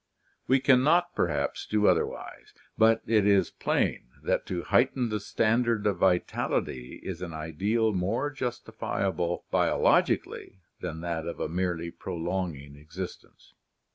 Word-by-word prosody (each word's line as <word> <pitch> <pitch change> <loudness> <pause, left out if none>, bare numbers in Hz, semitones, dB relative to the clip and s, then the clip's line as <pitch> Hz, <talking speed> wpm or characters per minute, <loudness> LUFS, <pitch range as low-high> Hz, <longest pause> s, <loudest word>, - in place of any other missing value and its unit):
We 135 +1 +4
can 130 -1 +5
not, 175 +4 +3
perhaps, 85 - -1
do 105 -1 +1
otherwise; 90 -4 -1 0.2
but 115 0 +4
it 105 -2 +3
is 100 -3 +3
plain - - -1 0.2
that - - 0
to 90 -2 -3
heighten 125 -1 +2
the 105 -1 -1
standard 115 +1 +1
of 100 -4 +1
vitality 90 -8 0
is 90 -2 -5
an 85 -3 -5
ideal 100 +9 0
more 105 +10 -1
justifiable 95 - -3
biologically 95 - +1 0.2
than 80 -2 -5
that 85 -2 -3
of 85 -2 -4
merely 85 -1 -2
prolonging 85 -6 -4
exist 80 +5 -7
ence. - - -24
95 Hz, 130 wpm, -28 LUFS, 85-115 Hz, 0.2 s, can